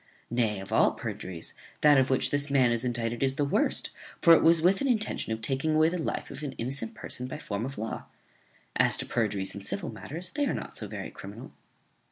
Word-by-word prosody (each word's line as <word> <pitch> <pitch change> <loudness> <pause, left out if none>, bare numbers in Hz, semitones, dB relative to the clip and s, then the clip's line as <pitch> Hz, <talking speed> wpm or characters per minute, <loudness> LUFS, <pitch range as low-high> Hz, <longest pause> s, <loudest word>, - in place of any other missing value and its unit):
Nay, 115 -4 +1
of 95 - -7
all - - +5
perjuries, 85 -3 -5 0.3
that 145 -2 +7
of 130 - +2
which 130 0 +2
this 145 0 0
man 130 -4 +4
is 120 0 0
indicted 120 -1 -2
is 135 -1 +2
the 145 - +1
worst; 140 - +1 0.3
for 170 - +8
it 165 - +6
was 165 0 +6
with 180 +4 +3
an 275 - +1
intention 220 - 0
of 110 0 -3
taking 135 +6 +1
away 155 +1 +5
the 175 0 -2
life - - -3
of - - -8
an 145 -3 -4
innocent 125 -2 -4
person 125 - -4
by 130 - -5
form 105 -6 -3
of 135 - -7
law. 110 +1 -4 0.7
As - - +4
to - - -2
perjuries 105 -4 -1
in 100 - -7
civil 170 - -3
matters, 170 +5 -5
they 290 -1 0
are - - 0
not - - -6
so - - -4
very - - -6
criminal." - - -9
135 Hz, 225 wpm, -28 LUFS, 115-155 Hz, 0.7 s, for